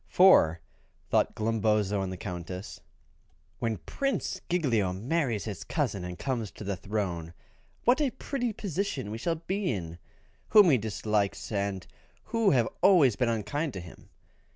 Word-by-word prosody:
For, 85 - +6 0.5
thought - - +2
Glumboso 105 -2 +1
and 95 -1 -3
the 95 - -5
Countess, 90 +2 -6 0.8
"when 115 -2 -1
Prince 275 0 -2
Giglio 120 - +1
marries 120 - -1
his 105 -4 -5
cousin 120 - -2
and 90 0 -6
comes 120 -6 -2
to - - -9
the 100 -1 -2
throne, 90 -4 -3 0.5
what 250 +5 +4
a 285 - +3
pretty 245 -1 -3
position 185 - -3
we 110 - -5
will 170 -1 +1
be 185 +3 -2
in, 85 -5 -5 0.5
whom 210 -6 +7
he 130 - +4
dislikes, 105 -1 -1
and 100 -3 -2 0.4
who 230 -2 +2
have 120 -7 +3
always 170 - +6
been 125 -2 +1
unkind 115 +7 -2
to 95 - -5
him. 85 -1 -13
110 Hz, 150 wpm, -29 LUFS, -, 0.8 s, whom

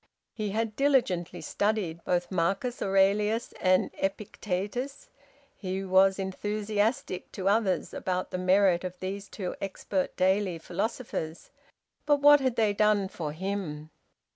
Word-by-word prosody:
He 215 -2 -3
had 220 +1 -2
diligently 190 -12 +1
studied 185 -1 -1
both 175 0 -1
Marcus 195 +8 -1
Aurelius 200 +3 +2
and 185 0 +3
Epictetus; 205 +6 -3 0.4
he 190 0 -4
was 190 0 +4
enthusiastic, 205 +1 -2
to 190 -1 -3
others, 200 -2 +1
about 185 0 -2
the 185 - -2
merit 185 -1 +3
of 180 0 -6
these 195 +2 -5
two 185 -4 -4
expert 195 -1 -3
daily 190 -1 +2
philosophers; 180 -2 -4 0.6
but 290 -1 +4
what 290 +1 +8
had 260 -3 0
they 215 -3 +2
done 205 -2 +2
for 160 -6 -4
him? 160 -3 -4
195 Hz, 125 wpm, -28 LUFS, 185-215 Hz, 0.6 s, what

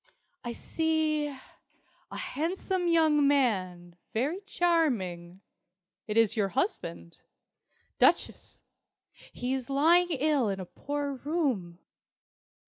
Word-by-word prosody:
"I 240 -1 -4
see 315 0 0
a 270 -2 -14
handsome 355 +4 -2
young 315 -4 +4
man 185 -11 0 0.2
very 295 - -1
charming. 195 - 0 0.7
It 210 0 -2
is 225 -1 +4
your 205 -3 +1
husband, 85 - -3 0.8
Duchess. - - +1 0.7
He 250 +1 -3
is 265 -1 -4
lying 335 +6 +4
ill 290 -6 +1
in 195 -1 -3
a 185 - -5
poor 285 +8 -4
room. 260 - -2
275 Hz, 100 wpm, -29 LUFS, 200-315 Hz, 0.8 s, young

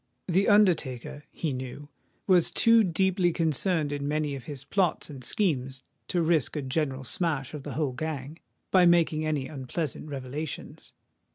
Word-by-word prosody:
The 190 +3 +2
undertaker, 150 - +2
he 155 -4 -3
knew, 130 +3 -6 0.4
was 180 -3 +4
too 230 -1 +5
deeply 185 0 +2
concerned 160 -1 0
in 145 0 -3
many 150 -1 -1
of 135 -3 -7
his 140 -3 -7
plots 175 -1 0
and 135 -3 -9
schemes 135 - -1 0.2
to 175 -2 +1
risk 160 -5 +1
a 150 - -2
general 135 0 -2
smash 145 -1 -1
of 150 - -5
the - - -6
whole 150 -4 0
gang, 150 +1 -5 0.3
by 180 -2 +6
making 160 -2 +3
any 145 -4 -1
unpleasant 145 +2 -4
revelations. 140 +2 -6
155 Hz, 155 wpm, -27 LUFS, 135-175 Hz, 0.4 s, by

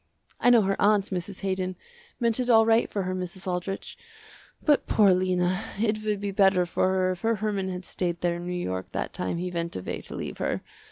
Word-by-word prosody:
I 245 - +4
know 235 -3 +6
her 195 0 -1
aunt, 205 -1 +3
Mrs. 185 +1 -4
Haydon, 185 -1 -2 0.4
meant 235 -1 +2
it 250 -1 -1
all 225 -2 +7
right 225 +1 +3
for 200 - -2
her 185 0 -2
Mrs. 185 0 -5
Aldrich, 185 +1 -4 0.7
but 295 -2 +3
poor 205 -3 +5
Lena, 185 +1 +1 0.2
it 215 -1 0
would 210 -2 -1
be 200 0 -3
better 190 -2 +4
for 175 - +1
her 185 0 +2
if 185 - -6
her 230 0 +2
Herman 205 -2 -2
had 180 -1 -5
stayed 175 -2 -2
there 175 -1 0
in 175 0 -7
New 180 - -2
York 95 - -4
that - - -3
time 90 - -2
he 180 +1 -3
went 170 -1 -2
away 90 - -4
to - - -6
leave - - -5
her. - - -1
190 Hz, 220 wpm, -26 LUFS, 180-210 Hz, 0.7 s, all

